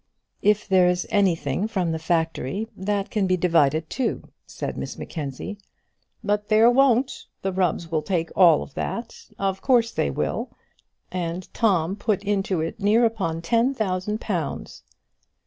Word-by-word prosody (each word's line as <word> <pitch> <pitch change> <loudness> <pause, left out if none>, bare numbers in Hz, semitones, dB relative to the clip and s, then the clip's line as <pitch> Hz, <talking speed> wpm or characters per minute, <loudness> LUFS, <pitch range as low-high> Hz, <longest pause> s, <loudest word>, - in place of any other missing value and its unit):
"If 210 0 +2
there 185 -2 +5
is 180 0 +1
anything 190 -4 +1
from 185 -6 -1
the 160 - -2
factory, 165 - -1
that 200 +1 -2
can 205 -3 +1
be 185 0 +2
divided 160 -3 +2
too," 260 - -2 0.2
said - - -5
Miss - - -5
Mackenzie. 155 +6 -6 0.6
"But 210 0 0
there 220 +2 +6
won't. 260 0 +2 0.2
The 195 - 0
Rubbs 180 -3 -1
will 160 -1 +1
take 165 -2 -1
all 170 -5 +6
that; 235 - -5
of 195 -1 -1
course 240 -4 +3
they 70 - 0
will. 70 - -2 0.6
And 180 0 -3
Tom 190 -5 +2
put 205 -2 -1
into 195 -4 0
it 165 +6 -4
near 215 +4 +4
upon 170 -8 -1
ten 235 +9 +2
thousand 210 -1 -1
pounds!" 175 -11 -4
190 Hz, 145 wpm, -24 LUFS, 165-215 Hz, 0.6 s, there